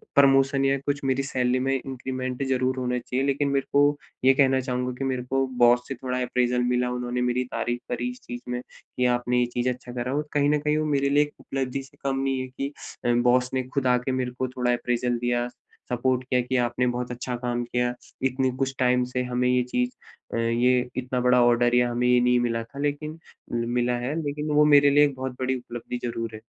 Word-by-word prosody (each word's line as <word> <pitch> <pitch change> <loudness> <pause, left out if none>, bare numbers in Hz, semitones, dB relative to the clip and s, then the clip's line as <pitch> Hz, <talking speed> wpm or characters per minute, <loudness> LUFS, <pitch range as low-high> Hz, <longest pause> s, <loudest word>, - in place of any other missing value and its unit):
Promotion 135 0 +4
या 135 0 +3
कुछ 140 0 -1
मेरी 135 0 +1
सैलरी 125 -2 0
में 135 +1 0
इंक्रीमेंट 130 0 -4
ज़रूर 130 0 0
होना 125 -1 -1
चाहिए। 130 +2 -2
लेकिन 140 +1 +1
मेरे 140 -1 0
को 145 +1 +4 0.3
ये 135 - +7
कहना 135 -1 +3
चाहूँगा 125 -1 -2
कि 135 - -4
मेरे 130 -2 -1
को 135 0 +2 0.2
बॉस 120 +1 +5
से 135 - -4
थोड़ा 125 0 -3
अप्रेज़ल 125 0 +1
मिला 125 0 +1
उन्होंने 125 0 -2
मेरी 125 +1 +1
तारीफ 120 0 -2
करी 125 0 -2
इस 125 - -12
चीज़ 120 0 -7
में 125 0 -2
कि 125 0 -5
आपने 125 0 0
ये 125 - +3
चीज़ 125 +1 0
अच्छा 125 0 -6
करा। 125 +1 -3
और 150 +1 -2
कहीं 145 -1 +3
न 150 0 +3
कहीं 150 +1 +1
वो 155 - 0
मेरे 140 -2 +1
लिए 145 +1 +4
एक 150 - -8
उपलब्धि 135 0 -3
से 135 - -18
कम 135 -1 0
नहीं 135 -1 0
है 130 - -5
कि 135 +2 -5 0.3
अ, 120 - +3
बॉस 125 +1 +3
ने 130 -1 0
खुद 130 +1 -2
आके 125 +1 +2
मेरे 130 -1 -1
को 130 - 0
थोड़ा 125 -1 0
अप्रेज़ल 120 0 0
दिया, 120 0 0 0.4
सपोर्ट 125 +1 +1
किया 125 0 +1
कि 125 +2 -3
आपने 125 +1 0
बहुत 125 0 -2
अच्छा 125 0 -4
काम 120 0 -2
किया। 120 0 -1 0.3
इतनी 130 0 0
कुछ 135 0 -1
टाइम 125 0 +3
से 125 - 0
हमें 125 0 0
ये 125 0 +3
चीज़ 125 0 -1 0.4
अ, - - -1
ये 120 +2 +2
इतना 130 0 -1
बड़ा 125 0 +4
ऑर्डर 120 0 +3
या 125 0 +3
हमें 120 +1 0
ये 125 0 +5
नहीं 125 0 +3
मिला 115 -1 -1
था 125 +5 -12
लेकिन 145 +1 -2 0.4
उम, 115 0 -1
मिला 125 0 +1
है। 130 +5 -2
लेकिन 150 +1 -3
वो 150 0 +6
मेरे 145 0 +7
लिए 145 +1 +6
एक 140 -2 -2
बहुत 130 -1 -5
बड़ी 130 0 0
उपलब्धि 120 0 -6
ज़रूर 115 -1 -4
है। 110 - -10
125 Hz, 230 wpm, -25 LUFS, 125-135 Hz, 0.4 s, ये